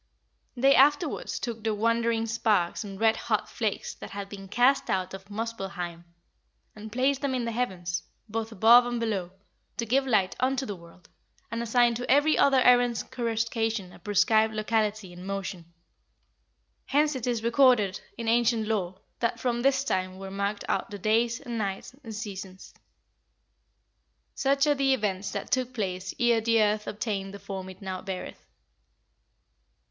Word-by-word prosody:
They 270 Hz, +3 st, +5 dB
afterwards 290 Hz, +4 st, +3 dB
took 230 Hz, -3 st, -5 dB
the 220 Hz, -1 st, 0 dB
wandering 230 Hz, +1 st, +1 dB
sparks 220 Hz, -5 st, +1 dB
and 195 Hz, -2 st, -8 dB
red 225 Hz, 0 st, +4 dB
hot -, -, -1 dB
flakes -, -, -3 dB
that -, -, -10 dB
had 200 Hz, 0 st, -6 dB
been 195 Hz, -1 st, -9 dB
cast 245 Hz, +7 st, +3 dB
out 185 Hz, -1 st, -1 dB
of 195 Hz, +1 st, -9 dB
Muspellheim, 195 Hz, -6 st, -5 dB, 0.7 s
and 215 Hz, 0 st, -9 dB
placed 265 Hz, +3 st, +1 dB
them 275 Hz, -2 st, 0 dB
in 245 Hz, -2 st, -1 dB
the 230 Hz, -, -2 dB
heavens, 185 Hz, -7 st, -2 dB, 0.3 s
both 225 Hz, +1 st, -3 dB
above 230 Hz, +4 st, +6 dB
and 240 Hz, -1 st, -2 dB
below, 205 Hz, -6 st, -2 dB, 0.5 s
to 235 Hz, -, -1 dB
give 265 Hz, +4 st, +1 dB
light 205 Hz, -7 st, +2 dB
unto 265 Hz, +1 st, +1 dB
the 205 Hz, -, -4 dB
world, 170 Hz, 0 st, -17 dB, 0.4 s
and 230 Hz, 0 st, -2 dB
assigned 235 Hz, 0 st, +3 dB
to 245 Hz, -, -6 dB
every 290 Hz, +3 st, +4 dB
other 275 Hz, -2 st, +4 dB
errant 245 Hz, -2 st, +4 dB
coruscation 225 Hz, -4 st, -1 dB
a -, -, -14 dB
prescribed 220 Hz, +1 st, +2 dB
locality 215 Hz, -3 st, -1 dB
and 180 Hz, +2 st, -10 dB
motion. 195 Hz, -3 st, -5 dB, 1.2 s
Hence 295 Hz, +1 st, +2 dB
it 255 Hz, -2 st, -4 dB
is 235 Hz, -2 st, -1 dB
recorded 235 Hz, -5 st, +4 dB, 0.2 s
in 230 Hz, -1 st, -5 dB
ancient 230 Hz, -1 st, +2 dB
lore 190 Hz, -4 st, -2 dB, 0.2 s
that 235 Hz, -, -1 dB
from 240 Hz, -2 st, -1 dB
this 275 Hz, +1 st, +2 dB
time 185 Hz, -7 st, -2 dB
were 195 Hz, 0 st, -8 dB
marked 200 Hz, +1 st, -2 dB
out -, -, -1 dB
the 205 Hz, -, -6 dB
days, 230 Hz, +4 st, +1 dB
and 240 Hz, -4 st, -5 dB
nights, 195 Hz, +2 st, -4 dB
and 225 Hz, -3 st, -7 dB
seasons." 195 Hz, -3 st, -7 dB, 1.6 s
"Such 275 Hz, +1 st, +2 dB
are 295 Hz, -, +4 dB
the 275 Hz, -1 st, +2 dB
events 200 Hz, -4 st, -2 dB
that -, -, -5 dB
took 255 Hz, -1 st, 0 dB
place 185 Hz, -4 st, -3 dB
ere 235 Hz, -2 st, +3 dB
the 230 Hz, 0 st, +3 dB
earth 210 Hz, 0 st, +1 dB
obtained 200 Hz, -2 st, -3 dB
the -, -, -6 dB
form 195 Hz, -1 st, -7 dB
it 185 Hz, +2 st, -12 dB
now 185 Hz, -1 st, -4 dB
beareth." 190 Hz, -2 st, -6 dB
220 Hz, 165 wpm, -27 LUFS, 195-245 Hz, 1.6 s, above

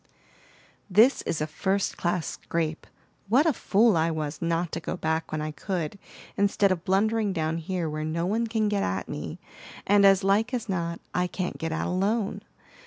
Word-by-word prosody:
"This 220 Hz, +8 st, +5 dB
is 155 Hz, -, -1 dB
a -, -, +1 dB
first 190 Hz, +5 st, -1 dB
class 175 Hz, -1 st, -1 dB
scrape. 165 Hz, -1 st, -3 dB, 0.4 s
What 260 Hz, +8 st, +5 dB
a 320 Hz, -, +3 dB
fool 220 Hz, -2 st, +3 dB
I 165 Hz, 0 st, +2 dB
was 155 Hz, -2 st, -4 dB
not 170 Hz, 0 st, 0 dB
to -, -, -3 dB
go -, -, -4 dB
back 160 Hz, 0 st, -1 dB
when 155 Hz, -, -2 dB
I 155 Hz, -, -3 dB
could, 175 Hz, +3 st, -4 dB, 0.4 s
instead 200 Hz, -1 st, +2 dB
of 180 Hz, -2 st, -1 dB
blundering 210 Hz, +2 st, +1 dB
down 160 Hz, -1 st, -1 dB
here 175 Hz, 0 st, -2 dB
where 155 Hz, 0 st, -3 dB
no 165 Hz, +2 st, -1 dB
one 225 Hz, +5 st, 0 dB
can 220 Hz, -1 st, 0 dB
get 205 Hz, -1 st, 0 dB
at 95 Hz, +1 st, -2 dB
me, -, -, -5 dB, 0.5 s
and 205 Hz, 0 st, +5 dB
as 195 Hz, -1 st, +6 dB
like 215 Hz, +6 st, +2 dB
as 235 Hz, -2 st, -4 dB
not 170 Hz, -3 st, -2 dB
I 180 Hz, 0 st, +1 dB
can't 180 Hz, 0 st, -4 dB
get 165 Hz, 0 st, -2 dB
out 160 Hz, -, -1 dB
alone! 200 Hz, +3 st, 0 dB
185 Hz, 185 wpm, -27 LUFS, 165-205 Hz, 0.5 s, as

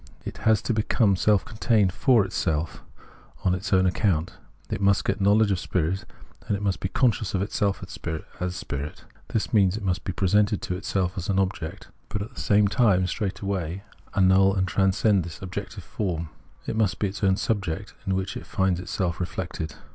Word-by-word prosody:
It -, -, -6 dB
has 110 Hz, -1 st, +3 dB
to 120 Hz, -, 0 dB
become 110 Hz, -2 st, +2 dB
self 105 Hz, +2 st, +3 dB
contained 110 Hz, -4 st, +2 dB
for 115 Hz, -3 st, +4 dB
itself, 80 Hz, -3 st, -2 dB, 0.6 s
on 90 Hz, -, +4 dB
its 95 Hz, +2 st, -3 dB
own 95 Hz, -1 st, +4 dB
account; 90 Hz, -3 st, +1 dB, 0.4 s
it -, -, -2 dB
must 100 Hz, 0 st, +3 dB
get 100 Hz, +1 st, 0 dB
knowledge 105 Hz, +1 st, +4 dB
of 95 Hz, -, +1 dB
spirit, 90 Hz, +2 st, -1 dB, 0.4 s
and 100 Hz, -, 0 dB
must 100 Hz, -2 st, -1 dB
be 95 Hz, -, -2 dB
consciousness 110 Hz, -3 st, +1 dB
of 95 Hz, -, +1 dB
itself 100 Hz, -1 st, -1 dB
as 90 Hz, +3 st, -5 dB
spirit. 70 Hz, -3 st, -5 dB, 0.2 s
This 110 Hz, -, -2 dB
means, 100 Hz, -2 st, +4 dB
it 110 Hz, -, -6 dB
must 90 Hz, -1 st, 0 dB
be -, -, -2 dB
presented 100 Hz, +3 st, +2 dB
to 90 Hz, -, -2 dB
itself 90 Hz, 0 st, -1 dB
as 90 Hz, -, -5 dB
an 95 Hz, -, +1 dB
object, 95 Hz, -4 st, -2 dB, 0.2 s
but 105 Hz, -, -3 dB
at 115 Hz, +5 st, -10 dB
the -, -, -6 dB
same 105 Hz, -3 st, +4 dB
time 100 Hz, -4 st, +3 dB
straightway 95 Hz, -2 st, -3 dB, 0.3 s
annul 95 Hz, 0 st, +5 dB
and 95 Hz, -1 st, +1 dB
transcend 95 Hz, +1 st, +2 dB
this 85 Hz, -1 st, -8 dB
objective 95 Hz, -2 st, -6 dB
form; 85 Hz, -6 st, -3 dB, 0.4 s
it -, -, -3 dB
must 100 Hz, -6 st, +1 dB
be 105 Hz, -, 0 dB
its 100 Hz, +2 st, -8 dB
own 95 Hz, -1 st, +4 dB
object 95 Hz, -7 st, -2 dB
in 95 Hz, -, +1 dB
which 95 Hz, 0 st, -2 dB
it -, -, -7 dB
finds 95 Hz, -2 st, +1 dB
itself 90 Hz, -1 st, -2 dB
reflected. 85 Hz, -3 st, -4 dB
95 Hz, 185 wpm, -25 LUFS, 90-105 Hz, 0.6 s, annul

